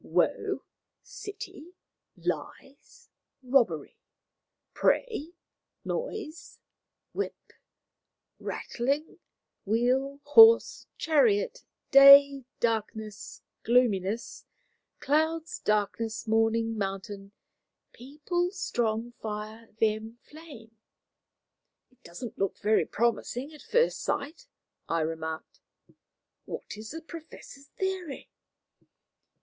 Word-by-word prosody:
] - - -29
"Woe, - - 0 0.4
city, 410 -7 -9 0.4
lies, 275 +1 -6 0.4
robbery, 235 - +1 0.7
prey, 350 - 0 0.5
noise, 420 -9 -5 0.6
whip, - - -5 0.9
rattling, 280 +6 -3 0.4
wheel, 255 +6 0
horse, 450 +11 +6
chariot, 415 +10 +2 0.3
day, 275 -1 +9
darkness, 220 -2 -3 0.2
gloominess, 225 -3 0 0.5
clouds, 315 +3 0
darkness, 215 +2 -1
morning, 225 +1 +1
mountain, 195 0 -5 0.6
people, 305 +7 -3
strong, 240 - -2
fire, 215 +1 -6
them, 220 +1 0
flame." 280 -8 -13 1.2
"It 255 0 -31
doesn't 220 +7 -9
look 195 -1 -1
very 215 +1 +2
promising 240 +5 -1
at 300 - -13
first 485 0 +1
sight," 320 - -3 0.4
I 165 0 +1
remarked. 160 0 -5 0.9
"What - - -7
is 215 +1 -9
the 325 +2 -7
Professor's 315 -4 -12
theory?" 375 -6 -4
250 Hz, 80 wpm, -28 LUFS, 220-315 Hz, 1.2 s, day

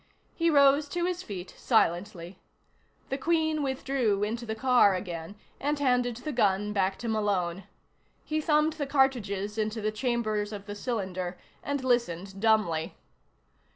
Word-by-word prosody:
He 335 0 +1
rose 285 -1 +5
to 350 +2 -1
his 360 0 -2
feet 190 - -7
silently. 180 -4 0 0.7
The 270 - -2
Queen 315 0 +1
withdrew 265 -6 0
into 230 +3 -3
the 220 - -2
car 245 -5 +4
again 175 0 -6 0.2
and 295 +2 0
handed 250 -4 +1
the 275 +6 -5
gun 210 -4 +1
back 195 -1 +1
to 235 - -6
Malone. 195 -5 -1 0.6
He 310 0 -1
thumbed 305 0 +2
the 295 -3 -4
cartridges 220 -7 +1
into 215 +1 -1
the 215 0 -1
chambers 215 -3 -1
of 205 -2 -7
the 205 - -6
cylinder 190 -5 -3 0.2
and 285 -2 -3
listened 195 -6 -1
dumbly. 210 -8 +2
220 Hz, 145 wpm, -28 LUFS, 200-270 Hz, 0.7 s, rose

